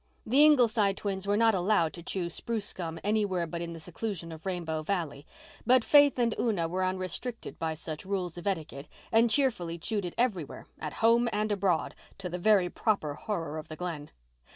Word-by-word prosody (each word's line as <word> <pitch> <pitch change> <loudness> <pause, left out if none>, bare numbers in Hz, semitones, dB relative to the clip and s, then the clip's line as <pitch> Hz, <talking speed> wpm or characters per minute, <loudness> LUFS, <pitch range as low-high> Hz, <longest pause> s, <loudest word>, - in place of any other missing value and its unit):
The 270 +6 +5
Ingleside 230 -9 +4
twins 195 -1 -3
were 205 +1 +2
not 225 0 +4
allowed 180 -3 +2
to 170 - -9
chew 175 0 -3
spruce 220 +2 -3
gum 165 -2 -5
anywhere 205 -4 +1
but 170 +1 -5
in 170 0 -5
the 165 - -8
seclusion 175 0 -5
of 160 +2 -9
Rainbow 165 -4 -2
Valley, 155 -4 -3 0.4
but 250 -1 +4
Faith 290 -2 +6
and 235 -2 +2
Una 200 -8 +1
were 185 +3 -1
unrestricted 185 +6 -3
by 160 -1 -1
such 155 -1 -7
rules 185 -3 -3
of 175 +2 -7
etiquette 155 -7 -3 0.2
and 230 +1 +5
cheerfully 220 -11 +1
chewed 205 +3 -2
it 175 - -6
everywhere, 200 - -1
at 155 -2 -5
home 235 +1 +5
and 210 0 0
abroad, 195 -4 +1 0.2
to 190 -2 -5
the 180 +1 -4
very 200 -1 +4
proper 175 -6 0
horror 160 -3 -4
of 155 - -9
the 155 - -7
Glen. 160 -4 -5
185 Hz, 190 wpm, -29 LUFS, 165-215 Hz, 0.4 s, Faith